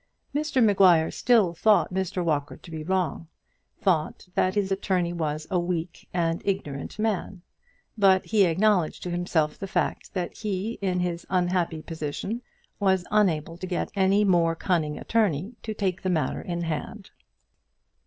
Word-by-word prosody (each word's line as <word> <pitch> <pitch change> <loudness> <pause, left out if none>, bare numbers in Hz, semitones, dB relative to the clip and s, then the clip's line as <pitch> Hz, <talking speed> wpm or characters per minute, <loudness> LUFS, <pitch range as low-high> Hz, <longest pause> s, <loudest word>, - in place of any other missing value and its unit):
Mr 290 -3 +1
Maguire 185 -6 +5
still 225 -8 +3
thought 210 +2 +3
Mr 185 -1 -1
Walker 145 -3 -1
to 170 - -14
be 160 -1 -5
wrong, 180 -1 -1 0.5
thought 175 -2 0
that 185 +2 +1
his 200 -2 0
attorney 185 -3 0
was 155 -2 -2
a 180 - +2
weak 175 -1 -3
and 165 -1 0
ignorant 150 -8 -3
man; 205 -4 -2 0.5
but 195 -3 +4
he 210 -3 +4
acknowledged 180 0 +2
to 180 - -4
himself 175 -3 0
the 195 - -4
fact 205 - -2
that 180 -2 -3
he 210 +1 -3
in 180 -2 0
his 175 -1 -3
unhappy 175 -3 0
position 165 +9 -4 0.4
was 190 -3 +2
unable 170 -6 +1
to 185 - -6
get 180 - -2
any 195 +1 +3
more 170 -4 +3
cunning 160 -4 0
attorney 205 - 0
to 220 - -5
take 190 -4 -2
the 185 - -1
matter 155 -7 0
in 170 -1 -4
hand. 160 -2 -5
180 Hz, 155 wpm, -26 LUFS, 165-195 Hz, 0.5 s, Maguire